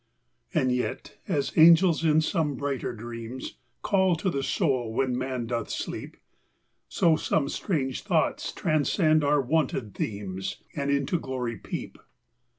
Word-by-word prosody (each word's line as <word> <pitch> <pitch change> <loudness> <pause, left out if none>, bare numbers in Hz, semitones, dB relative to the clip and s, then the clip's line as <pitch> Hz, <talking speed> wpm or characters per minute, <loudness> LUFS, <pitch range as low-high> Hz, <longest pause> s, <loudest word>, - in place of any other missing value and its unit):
And 130 -5 +2
yet, 125 0 -3
as 140 -2 -1
angels 165 +1 +6
in 155 -1 +4
some 155 -2 0
brighter 140 -1 -2
dreams 115 +2 -7 0.2
Call 190 -3 +3
to 180 +3 -1
the 140 - -1
soul 135 - 0
when 125 +2 0
man 130 -1 -2
doth 115 -1 -3
sleep, - - -5 0.7
So 165 -2 +3
some 150 -2 0
strange 135 -9 -2
thoughts - - 0
transcend 155 0 +2
our 145 +1 +3
wonted 130 -6 0
themes. 95 -3 -4
And 140 -1 -2
into 140 +4 +1
glory 125 -5 -4
peep. - - -6
140 Hz, 135 wpm, -27 LUFS, 125-155 Hz, 0.7 s, angels